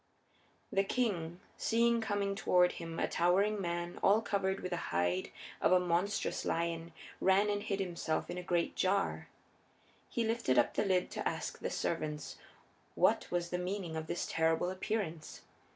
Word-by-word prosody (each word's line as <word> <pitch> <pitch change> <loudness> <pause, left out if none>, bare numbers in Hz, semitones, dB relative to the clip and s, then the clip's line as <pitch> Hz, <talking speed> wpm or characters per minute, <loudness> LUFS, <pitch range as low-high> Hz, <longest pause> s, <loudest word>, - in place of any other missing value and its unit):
The 195 - +3
king, 185 -7 -1 0.2
seeing 235 0 +2
coming 205 -2 0
toward 180 -2 +3
him 165 0 -7
a - - +1
towering 195 +4 +2
man 175 -1 -3
all 205 +2 +5
covered 195 -3 -1
with 185 - -4
the 175 - 0
hide 90 +1 0 0.3
of - - +3
a 185 - +6
monstrous 180 +3 0
lion, 165 0 -1 0.3
ran 195 +2 +4
and 205 0 -1
hid 200 -1 -2
himself 175 -4 -2
in 180 - -4
a - - -4
great 175 -1 0
jar. 195 +1 0 0.8
He 235 - -1
lifted 225 - +1
the 120 - +3
lid 185 -2 +3
up - - -16
to - - -1
ask - - -5
the - - -2
servants 150 -3 -3 0.6
what - - +3
was 175 -1 -1
the 180 - -1
meaning 180 -2 -3
of 160 0 -4
this 175 - -2
terrible 165 +2 +1
appearance. 185 -4 -3
180 Hz, 165 wpm, -33 LUFS, 170-200 Hz, 0.8 s, a